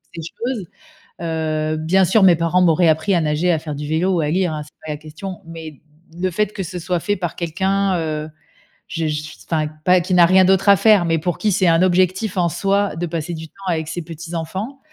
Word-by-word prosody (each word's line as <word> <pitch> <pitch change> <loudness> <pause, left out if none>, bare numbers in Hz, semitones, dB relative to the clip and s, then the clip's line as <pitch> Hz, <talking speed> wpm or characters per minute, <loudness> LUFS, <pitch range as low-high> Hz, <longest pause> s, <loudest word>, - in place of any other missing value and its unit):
ces 165 - -5
choses, 230 +5 -4 0.6
heu, 155 -2 -1
bien 180 +5 +3
sûr, 195 +3 +3
mes 180 -3 +6
parents 170 +2 +2
m'auraient 170 0 +4
appris 160 +5 +2
à 170 - +3
nager, 155 +3 +1
à 160 - +1
faire 155 -1 -6
du 145 +1 -5
vélo 170 +5 +1
ou 170 - +1
à 150 - 0
lire, 180 -1 +1
hein, 150 -1 -4
c'est 150 - -18
pas 155 - -6
la 150 - -4
question, 160 +5 -8
mais 160 -3 -9 0.4
le 185 +1 0
fait 210 +3 0
que 195 - -4
ce 180 +1 -6
soit 175 0 -2
fait 205 +5 -1
par 175 -4 -4
quelqu'un, 190 +3 0
heu, 155 -1 -3 0.6
je 165 -1 -3
je 150 0 -2
suis 155 0 -10
enfin, 155 -2 0 0.2
pas 180 0 +5
qui 185 +2 -3
n'a 175 -1 +7
rien 185 +2 +5
d'autre 190 +1 +3
à 200 - +9
faire, 200 -1 +4
mais 165 0 +1
pour 175 +1 -2
qui 215 - 0
c'est 190 -1 +2
un 165 +1 +4
objectif, 185 +2 +1
en 170 -1 +2
soi, 200 +3 0
de 175 +1 -2
passer 165 0 -4
du 160 0 -7
temps - - -37
avec 160 -3 -1
ses 175 - -4
petits-enfants. 170 - -6
170 Hz, 235 wpm, -20 LUFS, 160-185 Hz, 0.6 s, à